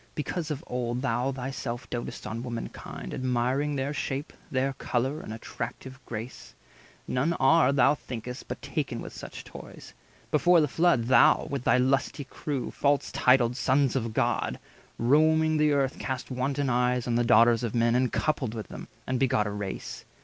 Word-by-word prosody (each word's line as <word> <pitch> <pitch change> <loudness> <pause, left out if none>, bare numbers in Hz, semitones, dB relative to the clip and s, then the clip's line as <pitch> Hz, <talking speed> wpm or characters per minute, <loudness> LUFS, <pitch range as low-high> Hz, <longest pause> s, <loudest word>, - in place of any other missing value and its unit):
Because 155 +2 -3
of 150 +1 -4
old 125 0 -3
Thou 125 +1 0
thyself 130 -2 -5
doat'st 120 -1 -5
on 115 +1 -4
womankind, 120 -2 -6
admiring 130 +3 0
Their 140 +2 -2
shape, 140 0 -3 0.2
their 135 +1 0
colour, 130 +3 -1
and - - -8
attractive 130 +3 -7
grace, 115 +2 -7 0.5
None 140 +7 +1
are, 155 -1 +4
thou 140 +1 +4
think'st, 125 -3 -7
but - - -6
taken - - -3
with - - -8
such - - -8
toys. - - -11 0.4
Before 175 +3 +5
the 150 - +3
Flood, 165 -4 +2
thou, 130 +3 +5
with 140 -3 -3
thy - - +4
lusty 135 +2 +1
crew, 140 0 -4
False 145 0 +1
titled 125 -2 +3
Sons 135 0 +2
of 115 -3 -1
God, - - 0 0.4
roaming 155 +5 +3
the 150 0 +3
Earth, 140 0 0
Cast 130 0 -4
wanton 135 +2 -1
eyes 125 0 +1
on 120 - -1
the 120 +1 +2
daughters 115 0 +5
of 120 -1 -3
men, 115 0 +3
180 125 +1 +3
And - - -1
coupled 130 -7 0
with 110 - -6
them, - - -8 0.2
and 130 -1 -1
begot 130 -5 +2
a 105 - -2
race. 100 -2 -5
130 Hz, 170 wpm, -27 LUFS, 120-140 Hz, 0.5 s, Before